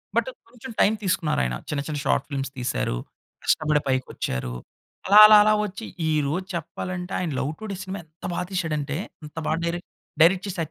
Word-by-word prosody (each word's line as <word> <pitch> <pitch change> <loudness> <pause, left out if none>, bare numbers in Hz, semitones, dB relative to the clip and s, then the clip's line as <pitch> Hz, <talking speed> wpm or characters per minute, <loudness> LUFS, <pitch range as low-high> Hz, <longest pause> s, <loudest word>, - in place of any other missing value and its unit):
But - - +2 0.2
కొంచెం 245 +1 -10
time 210 - +5
తీసుకున్నారు 175 - +1
ఆయన - - -1
చిన్న 145 -2 -1
చిన్న 150 -2 -3
షార్ట్ - - +2
ఫిల్మ్స్ 135 -2 -3
తీశారు, 120 - -1 0.5
కష్టపడి 150 -1 +2
పైకోచ్చారు. 95 - -2 0.5
అలా 205 +2 +8
అలా 215 0 +9
అలా 215 - +4
వచ్చి 210 +3 -7 0.2
ఈరోజు 155 +4 0
చెప్పాలంటే 180 +3 -5
ఆయన 175 -4 -2
'లవ్ 145 - -1
టుడే' 210 -3 -5
సినిమా 190 +1 -5
ఎంత 160 +1 -14
బా - - -2
తీసాడంటే 150 -5 -2 0.3
అంత 150 +1 -11
బాగా 160 - +1
డైరెక్ట్, 175 +1 -3 0.3
డైరెక్ట్ 180 +3 +5
చేసి 185 -2 -5
165 Hz, 170 wpm, -24 LUFS, 145-190 Hz, 0.5 s, అలా